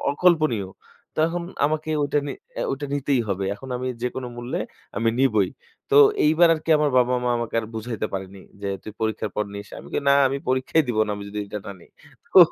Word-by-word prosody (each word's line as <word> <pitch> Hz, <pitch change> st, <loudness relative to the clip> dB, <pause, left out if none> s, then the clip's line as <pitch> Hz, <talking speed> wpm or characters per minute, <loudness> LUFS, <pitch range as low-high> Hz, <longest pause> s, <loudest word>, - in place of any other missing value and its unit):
অকল্পনীয়। 155 Hz, -, +2 dB, 0.5 s
তো -, -, -10 dB
এখন 175 Hz, +1 st, -3 dB, 0.2 s
আমাকে 155 Hz, +1 st, -2 dB
ঐটা 145 Hz, +1 st, +1 dB
নি -, -, -3 dB, 0.2 s
অ্যা -, -, -2 dB
ঐটা 140 Hz, +2 st, -4 dB
নিতেই 140 Hz, -2 st, +1 dB
হবে। 95 Hz, 0 st, -1 dB
এখন 130 Hz, +6 st, -11 dB
আমি 125 Hz, -, -4 dB, 0.2 s
যেকোন 125 Hz, +1 st, -2 dB
মূল্যে 120 Hz, +1 st, -3 dB, 0.4 s
আমি 115 Hz, -, +2 dB
নিবই। 110 Hz, -8 st, +3 dB, 0.4 s
তো 425 Hz, -, +4 dB, 0.3 s
এইবার 160 Hz, +3 st, +5 dB
আর 155 Hz, -, -5 dB
কি 165 Hz, -, -2 dB
আমার 150 Hz, -1 st, +2 dB
বাবা-মা 125 Hz, 0 st, +2 dB
আমাকে 120 Hz, -1 st, -4 dB
আর 110 Hz, -, -7 dB
বুঝাইতে 110 Hz, -1 st, -3 dB
পারেনি 95 Hz, 0 st, -6 dB, 0.2 s
যে, 100 Hz, -, -3 dB
"তুই 110 Hz, -, -8 dB
পরীক্ষার 110 Hz, -1 st, -1 dB
পর 105 Hz, -, +1 dB
নিস।" 100 Hz, 0 st, -7 dB
আমি -, -, -11 dB
কই 145 Hz, -, -1 dB
"না, 140 Hz, -, +7 dB
আমি 140 Hz, +1 st, -2 dB
পরীক্ষাই 130 Hz, +5 st, +2 dB
দিব 115 Hz, -, -1 dB
না। -, -, -3 dB
আমি 100 Hz, -, -7 dB
যদি 105 Hz, -, -5 dB
এটা 105 Hz, -, -5 dB
না -, -, -5 dB
নি।" -, -, -17 dB, 0.5 s
তো -, -, +8 dB
125 Hz, 210 wpm, -24 LUFS, 105-145 Hz, 0.5 s, তো